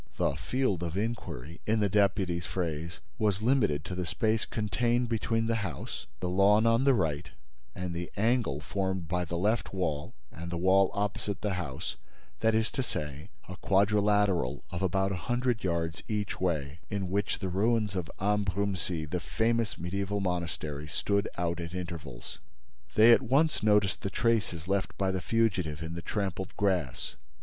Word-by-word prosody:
The - - +2
"field 125 -9 0
of 85 +1 -3
inquiry," 95 - -4
in 110 +1 +3
the 105 - +3
deputy's 95 -4 +1
phrase, 85 -1 -3 0.2
was 105 -2 +1
limited 105 - +2
to 95 - -4
the 90 -1 -2
space 110 +5 +1
contained 120 +3 0
between 115 0 +1
the 115 0 +1
house, 85 -9 -5
the 90 - -1
lawn 100 +4 +4
on 115 +3 +4
the 135 -2 +6
right 80 -5 -1 0.5
and 90 -1 -3
the 85 0 -4
angle 110 - +1
formed 95 0 -2
by 90 +1 0
the 85 +1 -3
left 105 +3 0
wall 80 -8 -2 0.2
and 85 +2 -7
the 85 - -2
wall 95 +2 +4
opposite 105 0 -2
the 105 -2 0
house, 90 -1 -4 0.4
that 110 0 +3
is 110 0 +1
to 135 - -1
say, 75 - -5 0.2
a 90 - -7
quadrilateral 100 -8 +2
of 90 0 -3
about 95 +1 +1
a - - -1
hundred 120 -1 +1
yards 85 -3 -1
each 105 -2 -2
way, 80 -4 -1
in 100 -3 -2
which 100 +1 0
the 95 - -3
ruins 105 +2 +1
of 90 -4 -2
Ambrumésy, 95 -4 0
the 90 +4 -1
famous 115 +4 0
mediæval 100 +4 -2
monastery, 80 -5 -2
stood 100 +6 0
out 85 0 -1
at 85 +1 -6
intervals. 80 -8 -6 0.6
They 110 +2 +8
at 115 - +7
once 140 +5 +2
noticed 105 -3 +3
the 100 - -2
traces 105 -8 0
left 95 -1 -1
by 95 -1 +1
the 95 -1 -2
fugitive 90 -10 +1
in 80 0 -5
the 85 - -5
trampled 95 0 -3
grass. 90 -10 0
95 Hz, 170 wpm, -30 LUFS, 85-110 Hz, 0.6 s, They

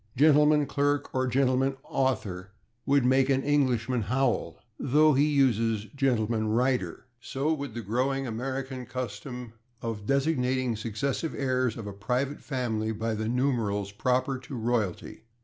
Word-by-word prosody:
/Gentleman 150 +1 +5
clerk/ 145 +1 0
or 130 0 0
/gentleman 135 +1 +2
author/ 100 -8 -1 0.4
would 140 -2 +3
make 130 +1 +3
an 135 -1 +2
Englishman 130 -4 +1
howl, 115 - 0 0.2
though 150 +3 +4
he 140 +2 +4
uses 115 -7 +2
/gentleman 115 -5 +1
rider/. 125 +1 0
So 135 +5 -1
would 140 -6 -5
the 120 - -4
growing 130 +6 0
American 130 +2 -4
custom 125 0 -6 0.3
of 110 -3 -5
designating 130 -3 +1
the 110 - -3
successive 120 +8 -2
heirs 130 -3 0
of 115 - -6
a 100 - -6
private 125 +8 -2
family 115 -5 -2
by 110 +1 -2
the 110 0 -2
numerals 115 -6 0
proper 130 +5 0
to 130 +1 -8
royalty. 115 -5 -2
125 Hz, 140 wpm, -28 LUFS, 115-135 Hz, 0.4 s, Gentleman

